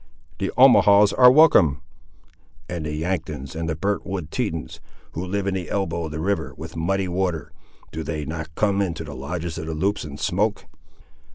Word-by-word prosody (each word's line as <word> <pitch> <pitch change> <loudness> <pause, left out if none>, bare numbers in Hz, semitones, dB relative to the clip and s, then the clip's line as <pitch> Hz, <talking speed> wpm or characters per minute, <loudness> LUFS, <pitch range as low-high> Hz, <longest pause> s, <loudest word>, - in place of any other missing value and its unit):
"The 95 - -1
Omahaws 105 -6 +6
are 125 -1 +8
welcome." 90 - +5 0.8
"And 85 -3 -4
the - - -3
Yanktons, 75 -5 -4
and 80 0 -3
the 80 - -1
burnt 100 +6 -1
wood 90 -5 -5
Tetons, 100 -11 -3 0.3
who 85 - -5
live 95 +2 -2
in 100 - 0
the 90 -4 -4
elbow 85 -4 -2
of 80 - -6
the 80 - -5
river, 80 -7 -2
'with - - -9
muddy 95 +4 -1
water,' 90 -4 -2 0.4
do 80 - -5
they 75 -1 -4
not 80 +1 -6
come 100 -2 +1
into 85 -4 -2
the 75 -2 -8
lodges 80 +4 -5
of 80 - -6
the 80 - -3
Loups 100 +6 -1
and 75 -1 -8
smoke?" 105 +4 0
85 Hz, 185 wpm, -23 LUFS, 80-100 Hz, 0.8 s, are